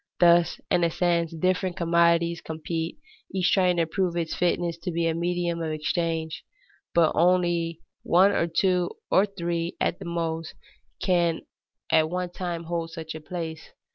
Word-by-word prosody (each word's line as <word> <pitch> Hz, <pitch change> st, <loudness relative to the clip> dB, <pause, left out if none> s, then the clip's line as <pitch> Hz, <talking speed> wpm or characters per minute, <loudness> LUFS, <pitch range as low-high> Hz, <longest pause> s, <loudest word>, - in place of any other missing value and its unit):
Thus, 170 Hz, -1 st, +5 dB
in 175 Hz, -, +3 dB
a 170 Hz, -, +3 dB
sense, 170 Hz, -1 st, +1 dB
different 185 Hz, +2 st, 0 dB
commodities 170 Hz, 0 st, +2 dB
compete, 160 Hz, +1 st, -4 dB, 0.4 s
each 185 Hz, -1 st, +2 dB
trying 180 Hz, -2 st, +3 dB
to 165 Hz, -, +3 dB
prove 175 Hz, +1 st, -1 dB
its 165 Hz, -2 st, -2 dB
fitness 175 Hz, -1 st, 0 dB
to 170 Hz, -, -4 dB
be 170 Hz, -1 st, 0 dB
a 165 Hz, -, +1 dB
medium 170 Hz, 0 st, -1 dB
of 160 Hz, -1 st, -2 dB
exchange; 160 Hz, 0 st, -2 dB, 0.5 s
but 165 Hz, -2 st, +5 dB
only 170 Hz, -1 st, +2 dB, 0.2 s
one, 185 Hz, +4 st, +4 dB
or 170 Hz, -, +1 dB
two, 180 Hz, +1 st, +1 dB, 0.2 s
or 195 Hz, +2 st, +5 dB
three 170 Hz, -3 st, -3 dB
at -, -, 0 dB
the 195 Hz, -, -8 dB
most, 165 Hz, -1 st, -3 dB, 0.5 s
can 175 Hz, -3 st, +2 dB, 0.5 s
at 155 Hz, 0 st, +4 dB
one 180 Hz, 0 st, -3 dB
time 175 Hz, -2 st, -4 dB
hold 165 Hz, 0 st, -3 dB
such 160 Hz, -1 st, -7 dB
a 155 Hz, -, -8 dB
place. 160 Hz, -1 st, -6 dB
170 Hz, 160 wpm, -26 LUFS, 165-175 Hz, 0.5 s, Thus